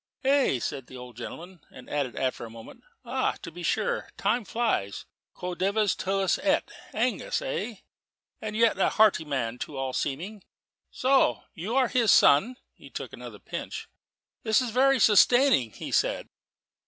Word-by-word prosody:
"Hey?" 270 - +3
cried 135 +2 -4
the 130 - -11
old 125 -1 -10
gentleman, 170 +8 -9
and - - -13
added 135 -6 -2
after 130 -2 -2
a 115 - -7
moment, 115 0 -12 0.2
"Ah, - - 0
to 165 - -7
be 175 +2 -10
sure, 485 - -1
time 240 -2 0
flies 215 - -1 0.3
quo 180 0 -5
dives 200 +2 +1
Tullus 195 0 0
et - - +1 0.2
Angus, - - -1
eh? 475 - -3 0.7
And 215 -1 -5
yet 225 -3 +3
a - - +3
hearty 215 -7 +3
man, 125 -5 -3
to 145 - -6
all 135 -1 -3
seeming. 180 +12 -3 0.5
So 255 - +2
you 200 +9 -4
are 265 -2 +4
his 235 -2 +1
son." 205 - +5 0.2
He - - -15
took - - -7
another - - -9
pinch. - - -7 0.5
"It 220 -2 +3
is 250 -3 -2
very 270 +3 +4
sustaining," 230 - +5
he - - -8
said. - - 0
195 Hz, 160 wpm, -27 LUFS, -, 0.7 s, son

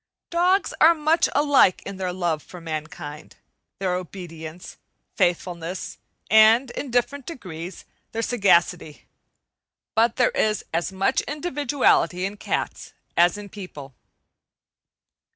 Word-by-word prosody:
Dogs 360 +3 +2
are 335 +2 +7
much 320 +2 +2
alike 285 -10 +4
in 200 -1 -6
their 185 -1 -2
love 175 -4 -1
for 180 - -12
mankind, 155 -2 -7 0.4
their 185 -2 -1
obedience, 175 -2 -7 0.4
faithfulness, 175 0 -2 0.3
and, 220 +4 +6
in 275 - -5
different 250 +3 -1
degrees, 180 - -8 0.3
their 225 0 -2
sagacity. 180 -8 +1 0.9
But 230 +1 +3
there 250 - +3
is 215 -2 0
as 170 +3 -1
much 190 +1 +1
individuality 285 - +1
in 200 +2 -5
cats - - -3 0.2
as 175 +3 +4
in 205 -1 -8
people. 150 -9 -9
190 Hz, 115 wpm, -24 LUFS, 175-250 Hz, 0.9 s, are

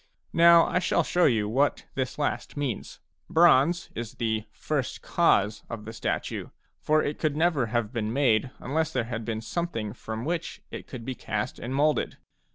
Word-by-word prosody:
Now 170 0 +7
I - - +1
shall 180 - +2
show 175 0 +2
you 110 -5 +2
what 135 +7 +1
this 130 -2 -3
last 145 0 -2
means. 135 -7 -3 0.3
Bronze 170 0 +4
is 115 +1 -6
the 110 -2 -1
"first 135 +5 -3
cause" 105 -11 +2
of 110 -2 -6
the 110 - -7
statue, 110 - -3 0.3
for 155 0 +2
it 145 - -3
could 150 -2 0
never 160 -7 +2
have 115 0 -1
been 110 -2 -1
made 130 -2 +2
unless 160 +4 -1
there 125 - 0
had 115 -1 -4
been 110 -1 -3
something 115 -7 -3
from 110 0 -6
which 170 +1 -3
it - - -7
could 125 -5 -8
be 130 - -3
cast 110 0 -4
and 125 +3 -4
moulded. 150 +2 +1
130 Hz, 175 wpm, -27 LUFS, 110-155 Hz, 0.3 s, Now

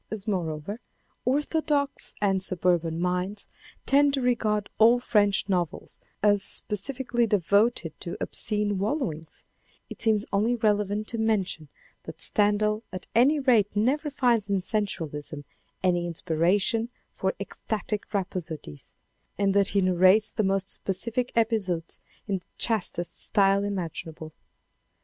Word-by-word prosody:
As 215 -2 -5
moreover, 180 +1 -3 0.5
orthodox 290 +1 +1
and 195 -2 +1
surburban 175 -3 0
minds 180 +3 -2 0.4
tend 285 0 +4
to 270 - -2
regard 215 -4 +1
all 230 +2 +6
French 205 -5 +2
novels 180 -5 -2 0.2
as 205 -1 +4
specifically 240 +4 -1
devoted 200 -2 +2
to 175 -2 -6
obscene 210 -2 -1
wallowings, 195 - -3 0.5
it - - -8
seems 215 -2 +2
only 220 +5 +2
relevant 210 -2 0
to 230 - -4
mention 195 -8 -1 0.4
that - - -9
Stendhal 210 +1 +2
at 185 -1 -7
any 270 +7 +4
rate 230 -7 +3
never 270 +9 +1
finds 240 -7 +1
in 195 -2 0
sensualism 155 -9 -3 0.4
any 175 -2 +1
inspiration 185 +7 +1 0.2
for - - -2
ecstatic 210 -1 -4
rhapsodies, 170 - -5 0.4
and 200 -1 +2
that 200 0 +3
he 200 - +3
narrates 185 +3 +4
the - - -1
most 195 -1 0
specific 230 +6 0
episodes 205 -8 -1 0.3
in 195 -2 -1
the - - -35
chastest 185 -6 -1
style 200 -1 +3
imaginable. 165 -5 -5
205 Hz, 120 wpm, -26 LUFS, 180-225 Hz, 0.5 s, all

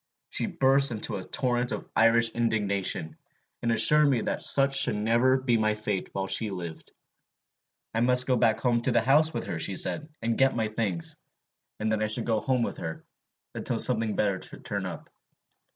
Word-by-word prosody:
She - - -1
burst 135 +1 +2
into 110 -3 -3
a 95 - -7
torrent 120 +3 -1
of - - -5
Irish 115 0 +4
indignation, 100 -8 -1 0.4
and 115 - 0
assured 145 +7 +5
me 125 -5 +1
that - - -3
such 135 0 +2
should 135 - +3
never 115 +5 +2
be 130 -3 +1
my 110 -1 +1
fate 105 -3 -3
while 95 0 -3
she 110 +3 +3
lived. 85 -4 -8 1.0
I 115 - 0
must 125 +1 +4
go 130 - +2
back 115 -2 +1
to 120 0 +1
the 120 - +3
house 150 +6 +3
with - - -4
her, 85 - -5
she 95 +4 -2
said, 155 - -1
and 115 0 -2
get 135 0 +3
my 110 -2 -1
things; 105 -6 -3 0.6
and 110 0 -1
then 110 -1 0
I 110 - +1
should 110 - -1
go 115 -2 +1
home 125 0 0
with - - -4
her, 80 -1 -7 0.5
until - - -2
something 115 -3 0
better 100 -3 0
should - - -12
turn - - -3
up. - - -9
115 Hz, 190 wpm, -27 LUFS, 105-125 Hz, 1.0 s, assured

